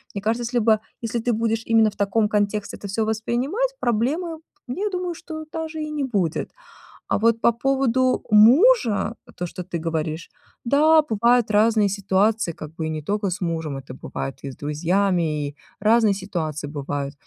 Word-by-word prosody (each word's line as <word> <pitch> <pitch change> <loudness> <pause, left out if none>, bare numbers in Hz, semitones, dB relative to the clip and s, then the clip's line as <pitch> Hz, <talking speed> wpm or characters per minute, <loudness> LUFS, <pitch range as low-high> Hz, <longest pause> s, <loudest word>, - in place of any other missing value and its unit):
Мне 200 - -3
кажется, 225 +4 0
если 240 +1 0
бы 220 -1 +3 0.2
если 230 0 -2
ты 240 +1 0
будешь 225 0 0
именно 225 -1 +4
в 205 - -14
таком 210 +2 +1
контексте 210 -1 -1
это 205 - -8
всё 200 +3 -1
воспринимать, 250 - -1
проблемы, 300 +9 -1 0.3
я 385 +12 -2
думаю, 360 -2 -3
что 315 -2 -8
даже 320 -1 -4
и 305 - -4
не 300 -2 -2
будет. 200 - -1 0.6
А - - +1
вот 230 +1 +2
по 235 - +5
поводу 260 0 +1
мужа, 235 - +5 0.2
то, 180 - -3
что 180 +1 -7
ты 175 -1 -5
говоришь, 160 0 -3 0.3
да, 310 +5 +5
бывают 235 -3 +2
разные 215 0 +4
ситуации, 200 0 +1
как 155 -1 -10
бы 160 -1 -4
и - - -2
не 155 -1 -4
тока 205 +5 -1
с 180 - -4
мужем, 160 -4 -2
это 130 -1 -10
бывает 135 +1 -6
и 140 - -4
с 130 - -11
друзьями, 160 0 0
и 145 - -11 0.2
разные 215 0 +4
ситуации 160 -7 -4
бывают, 145 -1 -4
215 Hz, 175 wpm, -23 LUFS, 175-245 Hz, 0.6 s, по